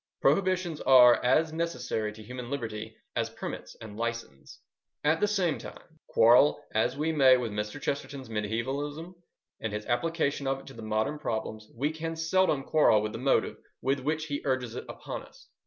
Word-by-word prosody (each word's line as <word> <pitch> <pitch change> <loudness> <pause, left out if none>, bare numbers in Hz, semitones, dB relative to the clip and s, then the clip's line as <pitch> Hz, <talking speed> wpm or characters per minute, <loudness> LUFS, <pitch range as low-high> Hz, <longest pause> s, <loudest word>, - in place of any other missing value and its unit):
Prohibitions 185 -4 +1
are 125 -2 +7
as 155 +6 +3
necessary 125 -10 -2
to 110 0 -12
human 125 +2 -7
liberty 115 -6 -5 0.2
as - - 0
permits - - -7
and 110 -2 -9
licences. 115 -12 -5 0.5
At 160 +2 +3
the 210 - +3
same 185 -7 0
time, 160 -1 -12
quarrel 120 +7 +5
as 120 +4 +1
we 155 +2 0
may 135 -4 +6
with 120 -3 -3
Mr. 105 +5 -4
Chesterton's 140 -2 -4
mediaevalism, 135 - -3 0.5
and 110 - -2
his 105 0 -4
application 140 +2 0
of 135 0 -1
it - - -17
to 130 -4 -10
modern 110 +7 -1
problems, 110 -5 -4
we 145 +5 0
can 165 +1 -4
seldom 160 -3 +2
quarrel 125 -8 +4
with 105 - -2
the - - -6
motive 135 +2 +1 0.2
with 135 +1 0
which 155 +4 -1
he 145 -2 -3
urges 130 -4 -1
it - - -6
upon - - -6
us. - - -17
135 Hz, 170 wpm, -29 LUFS, 115-155 Hz, 0.5 s, are